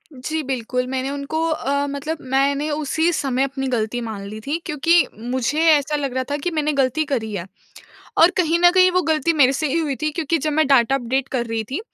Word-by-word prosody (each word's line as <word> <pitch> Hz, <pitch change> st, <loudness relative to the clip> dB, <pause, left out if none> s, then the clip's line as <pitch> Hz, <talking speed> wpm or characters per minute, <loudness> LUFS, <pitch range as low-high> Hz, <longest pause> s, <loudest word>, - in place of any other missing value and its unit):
जी, 310 Hz, +5 st, -3 dB
बिल्कुल 250 Hz, -1 st, -2 dB
मैंने 265 Hz, +1 st, -2 dB
उनको 285 Hz, +3 st, -3 dB
अ, 280 Hz, -2 st, -1 dB
मतलब 285 Hz, +3 st, -4 dB
मैंने 280 Hz, +2 st, +1 dB
उसी 310 Hz, +3 st, 0 dB
समय 270 Hz, -4 st, 0 dB
अपनी 270 Hz, 0 st, -3 dB
गलती 240 Hz, -1 st, -1 dB
मान 220 Hz, -4 st, -6 dB
ली 215 Hz, +1 st, -7 dB
थी, 300 Hz, -, 0 dB
क्योंकि 330 Hz, +3 st, +3 dB
मुझे 255 Hz, +5 st, -2 dB
ऐसा 295 Hz, 0 st, +2 dB
लग 280 Hz, -3 st, -2 dB
रहा 260 Hz, 0 st, -1 dB
था 290 Hz, -, 0 dB
कि 345 Hz, +5 st, -3 dB
मैंने 305 Hz, -2 st, 0 dB
गलती 275 Hz, +3 st, +1 dB
करी 230 Hz, -7 st, -3 dB
है। 175 Hz, -4 st, -4 dB, 0.7 s
और 335 Hz, +3 st, +7 dB
कहीं 335 Hz, -2 st, +2 dB
न 350 Hz, -, +7 dB
कहीं 370 Hz, 0 st, +6 dB
वो 365 Hz, 0 st, +1 dB
गलती 315 Hz, 0 st, +1 dB
मेरे 275 Hz, -4 st, +4 dB
से 305 Hz, +3 st, -1 dB
ही 330 Hz, -, 0 dB
हुई 300 Hz, -4 st, -1 dB
थी 305 Hz, -, +1 dB
क्योंकि 330 Hz, +1 st, -1 dB
जब 305 Hz, +1 st, -2 dB
मैं 310 Hz, -1 st, +2 dB
डाटा 270 Hz, -2 st, +4 dB
अपडेट 265 Hz, +1 st, -1 dB
कर 240 Hz, -3 st, -2 dB
रही 225 Hz, -1 st, -2 dB
थी, 275 Hz, -, -2 dB
280 Hz, 220 wpm, -21 LUFS, 255-310 Hz, 0.7 s, और